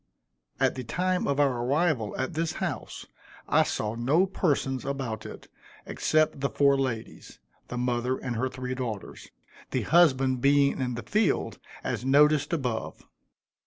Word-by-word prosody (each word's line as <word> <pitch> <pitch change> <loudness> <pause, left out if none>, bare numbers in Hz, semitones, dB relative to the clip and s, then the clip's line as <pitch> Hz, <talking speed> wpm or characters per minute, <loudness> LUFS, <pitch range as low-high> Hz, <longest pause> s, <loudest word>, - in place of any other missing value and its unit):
At - - +3
the 130 - -6
time 180 +9 -1
of 140 0 0
our 130 -4 +2
arrival 140 -5 0
at 130 +5 -2
this 165 +1 -1
house, 170 -11 -5 0.4
I - - +4
saw 105 0 -1
no 135 +10 +2
persons 145 -9 -1
about 130 -6 -4
it, - - -11 0.4
except 155 -2 +1
the 140 0 0
four 140 -1 +3
ladies 130 -5 -4 0.3
the 125 - -5
mother 125 +1 0
and 125 -2 -4
her 130 +3 -1
three 130 0 -5
daughters 120 -6 -6 0.4
the - - -1
husband 135 -7 +3
being 140 0 +3
in 125 -2 -2
the 120 - -6
field, 215 +1 0 0.2
as - - -3
noticed 145 +2 +4
above. 125 -9 -3
135 Hz, 150 wpm, -27 LUFS, 125-150 Hz, 0.4 s, I